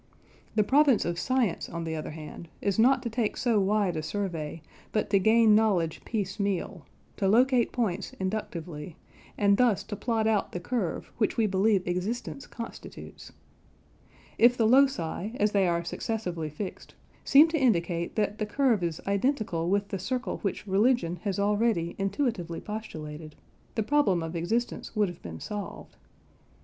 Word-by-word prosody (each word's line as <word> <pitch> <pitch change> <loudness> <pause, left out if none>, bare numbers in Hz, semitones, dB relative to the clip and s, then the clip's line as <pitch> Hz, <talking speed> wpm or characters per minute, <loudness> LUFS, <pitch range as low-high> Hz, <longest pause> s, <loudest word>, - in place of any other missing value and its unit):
The 215 - +4
province 275 0 +4
of 170 0 -2
science, 255 -6 0
on 170 0 -4
the 160 -1 -3
other 155 - -5
hand, 155 +1 -9
is 200 +1 -1
not 260 +4 +4
to 235 - -2
take 225 -2 -1
so 235 -4 +2
wide 200 -2 +1
a 155 - -2
survey, 165 -3 -4 0.3
but 215 -2 -1
to 200 - +5
gain 220 +2 +5
knowledge 195 -7 +2
piece 200 -4 -3
meal: 195 -4 -2 0.3
to 195 - +1
locate 245 +3 +4
points 205 -6 -2
inductively, 175 -5 -4 0.4
and 200 -1 +4
thus 240 -6 +3
to 210 - -6
plot 225 +1 -1
out 220 -2 +1
the 180 - -3
curve 200 -2 -3
which 215 - +1
we 225 - +3
believe 195 -1 +2
existence 220 +10 -3
constitutes. 230 -2 -9 1.1
If 245 +1 +6
the 225 - +3
loci, 225 -6 +2
as 210 0 +3
they 195 -3 +3
are 170 0 0
successively 175 -4 -3
fixed, 185 +6 -7 0.3
seem 290 +3 +7
to 320 -3 -1
indicate 170 -8 +1
that 210 -1 -1
the 215 - -1
curve 235 -2 +2
is 170 -2 -2
identical 200 - 0
with 200 +1 +1
the 195 - -3
circle 255 +7 -2
which 200 +1 -3
religion 200 -3 +2
has 200 0 -3
already 205 -4 +1
intuitively 195 - -1
postulated, 155 -8 -7 0.4
the 220 - +1
problem 210 - +2
of 165 +1 -5
existence 225 +9 -2
would 210 -3 +2
have 175 - -11
been 80 -1 -8
solved. 205 -1 -7
205 Hz, 160 wpm, -28 LUFS, 175-230 Hz, 1.1 s, seem